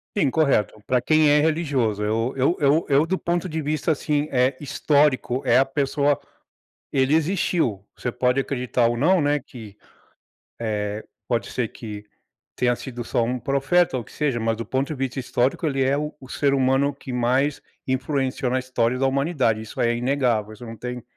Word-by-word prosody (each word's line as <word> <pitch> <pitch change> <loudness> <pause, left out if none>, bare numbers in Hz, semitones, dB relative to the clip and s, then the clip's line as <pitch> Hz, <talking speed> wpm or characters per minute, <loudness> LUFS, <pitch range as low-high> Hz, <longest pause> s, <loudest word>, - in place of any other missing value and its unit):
Sim, 150 -10 +2
correto, 135 -9 +1
para 125 -1 +1
quem 155 +4 +4
é 150 - +5
religioso. 140 -10 0
Eu 115 +4 -1
eu 135 +7 +2
eu 150 +2 +3
eu 140 0 +4
do 190 +2 0
ponto 175 +1 -2
de 160 0 -3
vista, 155 +2 0
assim, 150 0 0
eh, 130 +1 +2
histórico, 140 -3 +1
é 125 - +4
a 135 - +5
pessoa 140 +1 0 0.7
ele 135 +2 +2
existiu. 160 - +1
Você 120 - -3
pode 125 +1 +1
acreditar 125 -3 0
ou 120 - +1
não, 165 +8 +3
né, 145 0 +1
que, 110 -6 -12 0.8
eh, 105 -2 -3 0.2
pode 120 -2 -1
ser 120 -4 -1
que 105 -2 -9 0.5
tenha 120 -1 +2
sido 120 -1 -7
só 120 - 0
um 125 +2 -1
profeta 140 +6 +1
ou - - -4
o - - -16
que - - -18
seja, 140 -6 -1
mas 115 0 0
do 115 - -5
ponto 135 +3 -1
de 155 - -3
vista 135 -1 -3
histórico, 130 +4 0
ele 135 -3 0
é 135 +1 +2
o 150 0 -4
o 130 - -13
ser 140 +2 0
humano 135 +2 +2
que 135 -2 -9
mais 130 +4 +1 0.3
influenciou 130 0 -1
na 130 - +1
história 125 -1 0
da 135 - +2
humanidade. 135 -5 +1
Isso 110 - -10
é 120 0 +2
inegável. 120 -4 0
Isso 115 - -11
não 115 -1 -8
tem 125 +2 -6
130 Hz, 190 wpm, -23 LUFS, 120-145 Hz, 0.8 s, é